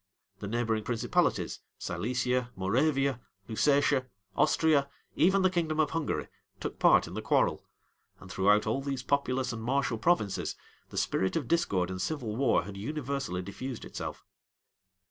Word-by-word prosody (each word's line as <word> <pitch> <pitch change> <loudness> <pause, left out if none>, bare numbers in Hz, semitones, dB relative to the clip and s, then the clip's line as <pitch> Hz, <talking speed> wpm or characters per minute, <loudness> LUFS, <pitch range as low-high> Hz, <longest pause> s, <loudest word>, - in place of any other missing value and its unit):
The 100 - -5
neighboring 110 0 0
principalities, 115 +1 0 0.2
Silesia, 125 +1 -1
Moravia, 135 +6 +1 0.3
Lusatia, 140 +2 +2 0.3
Austria, 150 -3 +3 0.3
even 190 +4 +4
the 185 - +5
kingdom 160 -3 0
of 150 -2 +2
Hungary, 165 -2 -2 0.3
took - - -5
part - - +6
in - - -9
the - - -3
quarrel; - - +2 0.6
and 95 - -11
throughout 105 +3 +3
all 110 +5 0
these 135 -2 -3
populous 130 -3 0
and 115 - -5
martial 120 -2 0
provinces, 110 - +1 0.3
the - - -8
spirit 95 - 0
of 150 -7 -1
discord 95 - +1
and 95 0 -4
civil 125 -9 -2
war 130 -1 +3
had 100 -1 -8
universally 135 -5 -3
diffused 120 +6 -6
itself. - - -6
125 Hz, 145 wpm, -30 LUFS, 110-145 Hz, 0.6 s, part